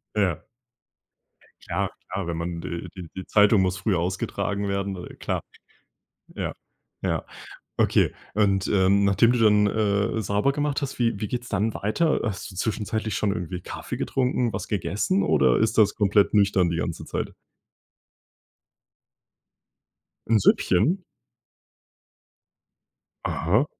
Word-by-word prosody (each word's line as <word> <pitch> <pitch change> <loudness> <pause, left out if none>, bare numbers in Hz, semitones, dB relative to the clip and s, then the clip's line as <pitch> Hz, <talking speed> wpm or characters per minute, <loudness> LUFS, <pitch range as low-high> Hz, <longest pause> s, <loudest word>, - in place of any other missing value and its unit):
Ja. 95 -7 0 1.2
Ja, - - 0 0.2
klar, 95 -2 -3
wenn 85 -1 -3
man 85 0 -4
de 85 +2 -5
die 90 -3 -8
die 95 - -6
Zeitung 105 -1 +5
muss 95 0 0
früh 95 +1 0
ausgetragen 95 +3 -2
werden, 100 0 -2
äh, - - -11
klar. - - -3 0.9
Ja, - - -3 0.5
ja. - - -1 0.5
Okay. - - +3 0.2
Und, 100 -2 +2
äh, 95 -2 +3
nachdem 100 +3 +4
du 125 - +1
dann, 105 -2 +5
äh, 105 +1 +1
sauber 105 +7 +1
gemacht 145 0 -1
hast, 140 -2 -4
wie 115 -4 +1
wie 105 - -2
geht's 120 -1 -3
dann 105 +2 0
weiter? 150 +11 +1
Hast 100 -2 -4
du 90 - -13
zwischenzeitlich 110 +1 -2
schon 105 -2 +1
irgendwie 90 -2 -4
Kaffee - - -6
getrunken, 125 -2 0
was 95 0 -4
gegessen 100 0 0
oder 65 -8 +3
ist 110 0 +1
das 105 -2 +4
komplett 100 -1 +3
nüchtern 100 -4 +3
die 85 - -2
ganze 85 0 -3
Zeit? - - -3 3.0
'N 115 -1 +4
Süppchen? 120 - +3 2.3
Aha. 105 - +1
100 Hz, 130 wpm, -25 LUFS, 95-110 Hz, 3.0 s, Zeitung